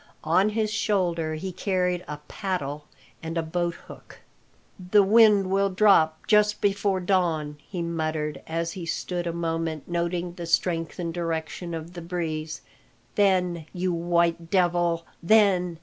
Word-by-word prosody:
On 185 +6 +3
his 215 0 -1
shoulder 170 -7 0
he 185 +4 -5
carried 180 -1 -1
a 150 - -5
paddle 150 -7 -4 0.3
and 165 +1 -4
a 165 - +1
boathook. 170 +1 -5 0.6
"The 190 +3 +4
wind 205 -2 +5
will 195 +1 +2
drop 185 -5 +3
just 210 -1 +3
before 200 -1 +1
dawn," 170 -5 0
he 180 -3 -3
muttered, 155 -2 -2
as 165 +1 -2
he 175 -2 -7
stood 175 +1 -3
a - - 0
moment 165 -2 -3
noting 175 0 -2
the 170 -1 -7
strength 165 0 0
and 170 -2 -3
direction 165 0 -3
of 165 +2 -7
the 175 - -7
breeze. 160 -2 -4 0.5
"Then, 180 -5 +1
you 180 -1 -1
white 170 0 +1
devil, 175 -2 +1 0.2
then!" 180 -3 +3
175 Hz, 140 wpm, -25 LUFS, 165-185 Hz, 0.6 s, wind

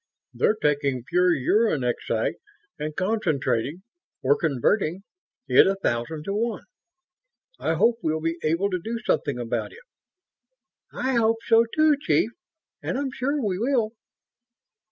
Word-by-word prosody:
They're 215 - +2
taking 140 - 0
pure 180 +6 +2
uranexite 135 - +1 0.5
and 150 0 -4
concentrating 175 - -1 0.4
or 135 +2 +4
converting 160 - 0 0.4
it - - +6
a 195 - +2
thousand 150 -3 -2
to 195 - -3
one. 225 +1 -2 1.0
I 160 - 0
hope 230 +7 +3
we'll 160 0 0
be 165 +1 -2
able 170 +6 0
to 180 - -1
do 230 +1 -3
something 140 -4 0
about 115 -2 -3
it." - - -15 1.1
"I 260 -1 -1
hope 225 0 +3
so, 230 0 +5
too, 310 -2 +4
Chief; 155 - +2 0.5
and - - -2
I'm 275 -1 -2
sure 275 +1 -1
we 185 -2 -1
will." 235 -2 +1
180 Hz, 135 wpm, -25 LUFS, 150-225 Hz, 1.1 s, it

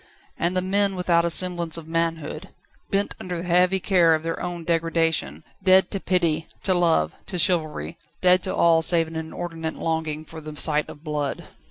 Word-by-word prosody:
And 175 +2 0
the 185 - 0
men 200 +1 +1
without 170 -2 +2
a - - +1
semblance 170 -1 +1
of 160 -1 -9
manhood. 165 -2 -3 0.4
Bent 200 +1 0
under 180 -1 -5
the 175 +1 -6
heavy 180 +2 +3
care 175 -4 +4
of 155 - -5
their 165 0 -3
own 175 -1 -5
degradation, 165 - 0 0.2
dead 185 -1 +4
to 195 - -2
pity, 170 -4 0 0.2
to 190 - +3
love, 165 - +2
to 180 - -4
chivalry; 155 - 0 0.2
dead 185 0 +4
to 185 - -2
all 165 -1 +4
save 165 0 +3
an 160 - -10
inordinate 160 0 -5
longing 160 -1 -3
for 160 0 -10
the 155 0 -9
sight 150 -1 +2
of 145 - -12
blood. 150 -3 -3
165 Hz, 185 wpm, -23 LUFS, 160-180 Hz, 0.4 s, care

